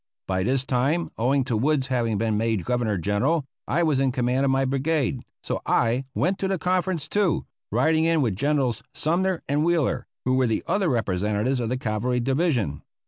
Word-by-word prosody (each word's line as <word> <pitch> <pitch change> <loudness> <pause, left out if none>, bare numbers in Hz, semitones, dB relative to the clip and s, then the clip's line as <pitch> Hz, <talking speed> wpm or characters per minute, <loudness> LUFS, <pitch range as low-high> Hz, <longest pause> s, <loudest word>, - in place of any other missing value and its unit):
By 95 -1 0
this 130 +6 0
time, 140 +7 0
owing 130 +4 +2
to 120 - -2
Wood's 135 +4 +1
having 120 -5 0
been 110 0 0
made 110 -4 0
Governor 120 -5 0
General, 125 - 0 0.2
I 170 +4 +1
was 155 -5 +2
in 135 -1 +2
command 125 +1 +1
of - - +2
my 135 0 +2
brigade, 135 -1 0 0.2
so - - -3
I 120 +3 +1
went 185 +4 0
to 195 - 0
the 190 0 0
conference 180 -3 -1
too, 205 0 +1 0.3
riding 160 0 +2
in 165 -1 +3
with 110 -6 0
Generals 135 -1 0
Sumner 180 +3 0
and 145 +2 +1
Wheeler, 160 -7 +1 0.2
who 130 0 +2
were 130 -1 +3
the 110 - -1
other 195 -4 +1
representatives 105 +2 0
of 115 -2 -2
the 130 - -1
cavalry 125 +1 -1
division. 130 - 0
130 Hz, 190 wpm, -24 LUFS, 115-155 Hz, 0.3 s, in